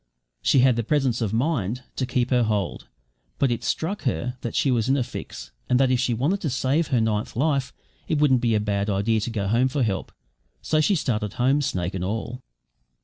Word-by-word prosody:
She 135 - +4
had 125 -2 +4
the 115 - 0
presence 130 -2 +1
of 110 -4 0
mind 125 - -1
to 130 - -2
keep 125 0 0
her 125 -1 +4
hold; 105 -5 -1 0.5
but 135 -3 +2
it 120 - -2
struck 190 +6 -2
her 125 -1 -2
that 120 - -4
she 135 - +2
was 120 -1 +1
in 135 - +3
a 130 - +1
fix, 125 - -8 0.2
and 125 - +3
that 135 -1 +3
if 125 - +2
she 125 -2 +1
wanted 155 - 0
to 155 - -1
save 135 +5 +1
her 125 - +1
ninth 110 -1 -1
life, 135 -1 0 0.4
it 155 - 0
wouldn't 135 -4 +3
be 115 -2 +2
a - - +3
bad 100 0 -1
idea 105 +3 +1
to 110 - -3
go 105 -4 -2
home 120 +5 +3
for 135 0 0
help. 100 -4 -2 0.5
So 155 -1 +2
she 195 +6 +3
started 110 - -1
home, 130 +3 +2
snake 90 -9 -2
and 95 -2 -3
all. 115 +6 -4
125 Hz, 220 wpm, -24 LUFS, 110-135 Hz, 0.5 s, She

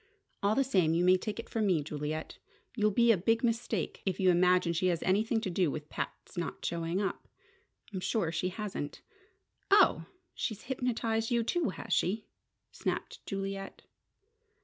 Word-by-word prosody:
All 205 +2 +2
the 275 - +4
same 185 -11 +2
you 175 +1 +2
may 185 0 +7
take 210 +4 -3
it - - -6
from 220 -2 0
me, 170 -6 +2
Juliet, 150 +1 -4 0.4
you'll 215 -2 +3
make 235 -1 +6
a 215 - +4
big 225 +7 +1
mistake 230 -5 -1
if 190 -2 -1
you 185 -1 +5
imagine 180 0 +4
she 175 +3 +1
has 170 -2 0
anything 220 +4 +2
to 195 - -2
do 175 -2 +2
with 150 +1 -5
Pat's - - -6
not 175 -2 -4
showing 170 +2 -1
up. 200 -2 -3 0.7
I'm 190 - -2
sure 185 -3 0
she 170 +3 -1
hasn't." 190 -7 -5 0.7
"Oh! 380 - +5 0.3
She's 220 -2 -3
hypnotized 230 -3 -1
you, 235 -2 +2
too, 340 - 0
has - - -4
she?" 210 +4 +1 0.5
snapped - - -4
Juliet. 195 0 -4
195 Hz, 170 wpm, -31 LUFS, 170-225 Hz, 0.7 s, may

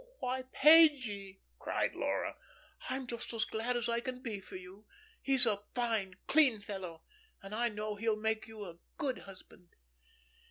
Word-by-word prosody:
"Why, 255 - -2
Pagie," 260 -11 +5 0.2
cried - - -1
Laura, - - -1 0.5
"I'm 260 +1 -2
just 235 -1 -5
as 225 - +1
glad 235 +3 -1
as 240 0 -1
I 235 0 +1
can 255 +1 -5
be 220 -5 -3
for 190 - -12
you. 185 +3 -11 0.3
He's 270 -2 +4
a 205 -3 +1
fine, 225 -6 0
clean 275 -8 +4
fellow, 190 -5 -7 0.4
and 195 +1 -8
I 235 +2 +2
know 210 0 -3
he 220 +2 -1
will 215 - +3
make 220 0 -1
you 220 -2 -8
a 170 -2 -10 0.2
good 265 -3 -1
husband." 185 -2 -15
220 Hz, 165 wpm, -33 LUFS, 200-250 Hz, 0.5 s, Pagie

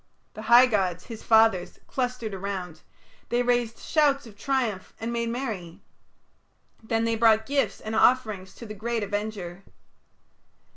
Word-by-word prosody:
The 215 - -8
high 240 +2 +9
gods, 190 -7 0
his 225 -2 -9
fathers, 220 -5 +3
clustered 245 -4 -3
around; 185 -4 -5 0.5
they 240 +1 +1
raised 240 -2 0
shouts 285 -3 +2
of 220 -3 -13
triumph 235 -5 -2
and 230 +1 -3
made 235 0 -1
merry. 220 -9 -5 1.0
Then 225 0 -1
they 230 0 +1
brought 220 -1 +4
gifts 280 +2 0
and 220 0 -5
offerings 215 -6 +2
to 235 - -10
the 215 - -7
great 225 +2 -2
Avenger. 200 -3 -4
220 Hz, 140 wpm, -26 LUFS, 200-240 Hz, 1.0 s, high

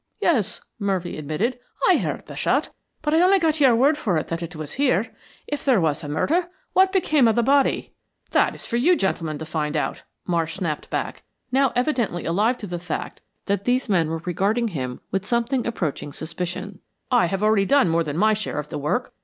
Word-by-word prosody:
"Yes," 240 - +1 0.2
Murphy 190 -4 -1
admitted. 155 - -2 0.3
"I - - +6
heard - - -3
the - - -9
shot, - - +1 0.3
but 300 0 0
I 325 - +5
only 380 +2 +6
got 320 -3 +1
your 265 -5 +6
word 285 +6 +3
for 185 -7 0
it 155 - -3
that 165 0 -3
it 170 0 -6
was 155 -2 -6
here. 230 -5 +1 0.3
If 290 - -4
there 260 -7 +4
was 160 -2 0
a 145 - -5
murder, 335 - +1 0.3
what 380 0 +5
became 310 -9 +3
of 220 - +3
the 235 - +3
body?" 275 +2 +2 0.4
"That - - +3
is - - -8
for 235 - -1
you 345 +9 +4
gentlemen 165 - -1
to 160 - -6
find 155 -1 -2
out," - - -2 0.2
Marsh 165 -2 -1
snapped 170 -6 -3
back, - - -3 0.3
now 265 0 +3
evidently 245 - 0
alive 210 +9 +2
to 210 - -7
the 175 -3 -4
fact 175 -2 -5 0.2
that 200 -1 -1
these 250 +2 +1
men 170 -5 +2
were 165 0 -4
regarding 205 +7 +1
him 130 -8 -5
with 195 0 -1
something 235 +3 0
approaching 165 -10 -3
suspicion. 180 +5 -5 0.3
"I 245 -8 +4
have 195 +3 -2
already 215 -2 +4
done 280 +1 +4
more 165 0 +2
than 150 -1 -4
my 215 +4 +4
share 210 -6 -3
of 150 0 -4
the - - -4
work. 245 - -1
200 Hz, 210 wpm, -23 LUFS, 165-255 Hz, 0.4 s, I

